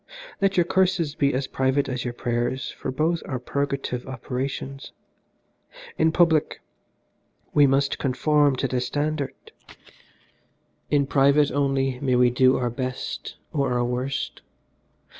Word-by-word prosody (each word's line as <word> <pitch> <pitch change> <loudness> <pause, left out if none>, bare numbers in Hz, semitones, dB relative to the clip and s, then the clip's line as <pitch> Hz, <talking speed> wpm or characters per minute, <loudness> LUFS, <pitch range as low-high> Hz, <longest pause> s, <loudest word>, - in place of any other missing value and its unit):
Let 195 -1 +2
your 175 - +6
curses 180 -4 +1
be 140 -2 +1
as 135 +1 -1
private 135 +2 0
as 125 -1 -3
your 120 - -3
prayers 120 +2 -2
for - - -6
both 160 +5 0
are 130 - -2
purgative 135 -1 -3
operations. 135 +1 -5 1.0
In 160 - +3
public 160 -2 +2 0.9
we 145 -1 +6
must 135 +1 +1
conform 145 +1 +2
to 135 - -1
the 125 -1 -1
standard, 145 +3 -2 1.5
in 145 -2 +3
private 140 +1 +3
only 135 -2 0
may 130 -2 +1
we 125 0 +4
do 130 +1 +4
our 120 -2 -1
best 130 +1 -5 0.2
or 140 -4 0
our 120 0 +1
worst. 125 +2 -3
135 Hz, 130 wpm, -24 LUFS, 130-145 Hz, 1.5 s, your